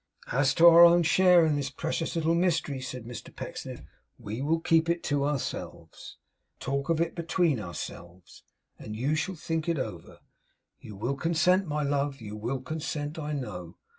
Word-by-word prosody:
'As 135 +1 +2
to 170 - +5
our 170 0 +9
own 170 0 +7
share 180 0 +5
in 155 -2 +1
the 135 -2 -3
precious 165 +1 -2
little 165 0 +1
mystery,' 170 -6 0
said 125 -2 -7
Mr 120 -1 -9
Pecksniff, - - -7 0.3
'we 110 +5 -6
will 160 +4 +1
keep 165 0 +2
it 170 0 0
to 145 -1 0
ourselves, 145 -3 -5 0.4
and - - -46
talk 140 +2 -3
of 165 -1 +2
it 170 0 0
between 170 -5 0
ourselves, 85 -1 -9 0.4
and 105 - -7
you 130 +7 0
shall 185 +5 -2
think 160 +1 -3
it 165 - 0
over. 90 -10 -6 0.6
You 105 - -11
will 120 +8 -2
consent, 170 +5 +2
my 150 0 -1
love; 140 0 -1
you 105 -2 -8
will 120 +5 -3
consent, 150 +1 -4
I 150 -1 -4
know. 100 - -6
145 Hz, 175 wpm, -28 LUFS, 125-165 Hz, 0.6 s, our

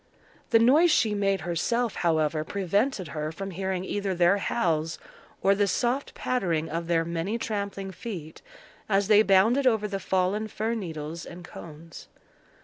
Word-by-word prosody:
The 230 - +6
noise 280 +10 +5
she 225 -8 +3
made 195 -1 0
herself, 225 +7 -1
however, 155 -2 +1
prevented 200 - -1
her 150 +1 -3
from 195 +4 -6
hearing 190 0 -3
either 200 -2 -2
their 175 +3 +4
howls 160 -7 0 0.5
or 195 - +5
the 200 0 +1
soft 245 +8 -1
pattering 170 -10 -1
of 165 +1 -3
their 165 -1 +1
many 170 +6 -2
trampling 200 -3 -4
feet 180 -7 -8 0.5
as 200 0 +2
they 210 -1 +7
bounded 220 +7 +4
over 220 -3 +2
the 195 -1 -3
fallen 190 +3 0
fir 220 +2 -2
needles 165 -6 -5
and 175 +1 -10
cones. 165 -1 -11
195 Hz, 150 wpm, -27 LUFS, 170-215 Hz, 0.5 s, they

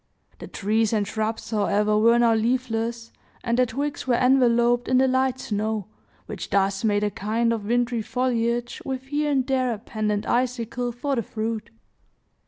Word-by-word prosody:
The - - -8
trees 220 +2 0
and 210 -2 +1
shrubs, 220 +2 -3
however, 210 0 +1
were 230 +2 +5
now 235 -1 +4
leafless, 230 0 -1 0.3
and 235 +1 0
their 250 - +4
twigs 285 +4 -4
were 245 - +3
enveloped 245 -1 +3
in 255 - +3
the 265 +1 +4
light 260 0 +1
snow, 215 -2 -2 0.4
which - - -7
thus 195 0 +1
made 205 -2 +2
a 205 - 0
kind 230 +4 0
of 215 -3 -4
wintry 240 0 +1
foliage, 240 0 -1
with 260 -1 -4
here 295 +2 -1
and 265 -3 +1
there 255 -2 +1
a 225 - -3
pendent 210 -1 -3
icicle 245 0 -1
for 270 +4 -2
the - - +2
fruit. 220 +1 -4
235 Hz, 170 wpm, -24 LUFS, 215-250 Hz, 0.4 s, were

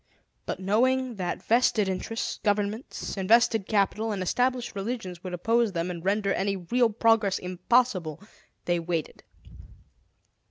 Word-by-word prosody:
But, - - -3
knowing 245 +5 +1
that 175 -2 -3
vested 225 -3 +3
interests, 190 +4 -3
governments, 210 +3 -2
invested 220 +1 +3
capital, 215 +1 +1
and 195 -3 -2
established 250 +5 0
religions 195 -4 -5
would 185 - -5
oppose 225 +3 +1
them 170 +1 -2
and 170 -2 -7
render 200 +1 +1
any 195 +1 0
real 235 +7 +1
progress 225 -2 +2
impossible, 185 - 0 0.5
they 175 -1 +1
waited. 165 -2 -3
205 Hz, 125 wpm, -27 LUFS, 185-230 Hz, 0.5 s, vested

